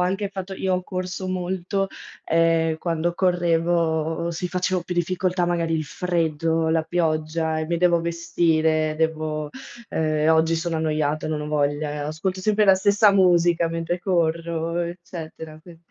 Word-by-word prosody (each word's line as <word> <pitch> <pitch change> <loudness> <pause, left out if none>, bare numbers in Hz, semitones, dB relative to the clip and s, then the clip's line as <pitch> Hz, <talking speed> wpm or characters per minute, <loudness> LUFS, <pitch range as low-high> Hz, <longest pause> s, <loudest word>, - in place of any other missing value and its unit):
anche 195 +3 0
fatto 190 -1 -6
io 190 0 -1
ho 180 0 -2
corso 185 +1 -4
molto, 185 +1 -2 0.4
ehm, 165 -1 +2
quando 170 0 -1
correvo, 170 -2 +1
sì, 170 +2 -3
facevo 180 0 -1
più 180 - -5
difficoltà, 180 +1 0
magari 170 -1 0
il 160 - 0
freddo, 165 -1 0
la 160 0 +2
pioggia 160 -1 0
e 155 - -2
mi 170 +1 0
devo 170 0 +3
vestire, 165 -2 +1
devo 155 -1 -1 0.4
ehm, 155 0 +1
oggi 160 +1 +3
sono 165 0 -2
annoiata, 155 -1 -1
non 155 -1 -2
ho 150 - -5
voglia, 145 0 -1
ascolto 180 +5 -3
sempre 210 +2 +2
la 190 -1 +7
stessa 205 +2 +4
musica 175 -3 +4
mentre 165 +1 -2
corro, 170 -2 -1
eccetera, 170 -2 -6
qui 170 +1 -14
165 Hz, 145 wpm, -23 LUFS, 160-180 Hz, 0.4 s, la